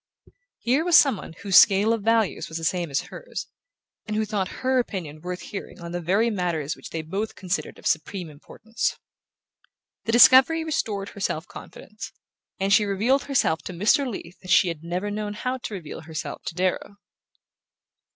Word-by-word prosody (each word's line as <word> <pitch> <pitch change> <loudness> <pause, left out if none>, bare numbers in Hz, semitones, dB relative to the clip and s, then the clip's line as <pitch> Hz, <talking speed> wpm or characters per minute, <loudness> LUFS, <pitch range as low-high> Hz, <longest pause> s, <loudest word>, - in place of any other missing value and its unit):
Here 260 +6 +1
was 345 -1 +6
some 275 -7 +5
one 165 - -9
whose 195 -3 +4
scale 205 +2 +6
of 225 - -2
values 225 -1 +1
was 160 - -5
the 165 - -7
same 175 0 0
as 140 - 0
hers, - - -7 0.6
and 215 - -3
who 215 0 +1
thought 205 -3 -1 0.2
her 260 0 +3
opinion 170 -10 -4
worth 180 +1 -5
hearing 205 - -8
on 170 -1 -7
the 175 0 -3
very 200 +8 +2
matters 170 -7 -2
which - - -11
they 160 -1 -4
both 195 +7 -4
considered 185 +2 -3
of - - -16
supreme 170 +3 -1
importance. 215 +9 -4 1.1
The 225 - 0
discovery 260 +6 +7
restored 210 -10 -2
her - - -12
self 160 -4 -2
confidence, 215 0 -10 0.5
and 195 +1 +2
she 210 - +6
revealed 215 +7 +1
herself 260 - +1
to 185 - -5
Mr. 250 - +2
Leath 180 -5 -8
as 185 - -10
she 180 - +5
had 165 -2 -6
never 180 +5 -3
known 210 0 -4
how 255 +4 -3
to 225 - -6
reveal 165 -6 -8
herself 160 0 -6
to 165 - -5
Darrow. 185 +2 -1
200 Hz, 180 wpm, -24 LUFS, 175-225 Hz, 1.1 s, discovery